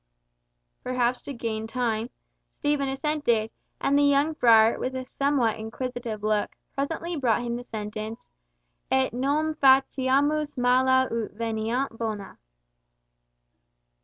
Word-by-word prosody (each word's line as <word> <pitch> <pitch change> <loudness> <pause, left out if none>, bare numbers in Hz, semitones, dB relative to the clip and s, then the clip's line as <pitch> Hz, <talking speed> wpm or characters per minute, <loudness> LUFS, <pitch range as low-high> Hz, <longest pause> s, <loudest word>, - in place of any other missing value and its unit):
Perhaps 250 -1 0
to 280 - -7
gain 220 -2 -3
time, 230 -1 -1 0.5
Stephen 290 -2 0
assented, 270 -6 0 0.3
and 280 - +1
the 285 - +5
young 285 +2 +3
friar, 225 -5 +5
with 260 +1 -3
a 260 0 -4
somewhat 255 -5 0
inquisitive 230 -1 -5
look, 215 -1 0 0.2
presently 325 +5 -3
brought 240 -5 +1
him 235 -1 -2
the 245 - -5
sentence 215 0 -6 0.6
"Et 265 -3 +2
non 290 +5 0
faciamus 275 +2 +3
mala 260 +1 +4
ut 230 -2 -3
veniant 225 +3 -2
bona." 215 -3 -5
250 Hz, 115 wpm, -26 LUFS, 225-275 Hz, 0.6 s, the